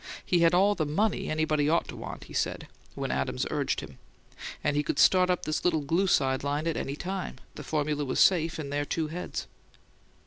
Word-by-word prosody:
He 175 - +2
had 170 +1 +4
"all 200 +3 +4
the 155 -6 -1
MONEY 200 +8 0
anybody 155 -1 +1
ought 170 +2 +2
to - - -6
want," - - -7
he - - -13
said, - - -1 0.3
when - - -3
Adams 65 -1 -1
urged - - -1
him; - - -11 0.6
and 145 - +1
he 145 - +3
could 150 - -3
"start 185 -1 +5
up 180 - 0
this 155 0 -1
little 165 -3 +2
glue 170 +7 +1
side 130 -6 +2
line" 145 +2 -1
at 165 - 0
any 140 - -3
time; 185 +4 -4 0.2
the - - -8
formula 150 -1 -1
was 130 - -2
safe 165 -3 +4
in 145 -3 -5
their 145 0 0
two 155 +1 -2
heads. 175 +3 -5
155 Hz, 210 wpm, -28 LUFS, 145-180 Hz, 0.6 s, start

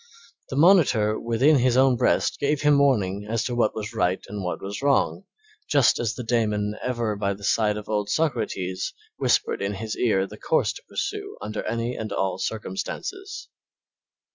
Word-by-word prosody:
The - - -4
monitor 140 - +4
within 130 +6 +3
his 125 0 +2
own 130 -1 +5
breast - - +1
gave 145 0 0
him 145 -1 +4
warning 105 -8 +1
as 115 0 0
to 125 - -3
what 120 -3 +1
was 110 +1 -5
right 95 -4 +1
and 100 -1 -5
what 90 - -3
was 100 +4 -6
wrong, 140 +7 +1 0.4
just 140 -4 +4
as 115 -1 -1
the 125 - -5
daemon 105 -3 0
ever 120 -4 -1
by 100 -1 -1
the 100 - -14
side 105 +1 +2
of 105 - -8
old 105 -1 -1
Socrates 95 - -1 0.2
whispered - - +1
in 100 +1 -2
his 110 +2 -4
ear 95 -5 +2
the - - -11
course - - +1
to - - -11
pursue - - -4
under 105 +1 -4
any 115 +2 -2
and 110 - -5
all 95 -1 -1
circumstances. 385 - -5
110 Hz, 175 wpm, -24 LUFS, 105-130 Hz, 0.4 s, own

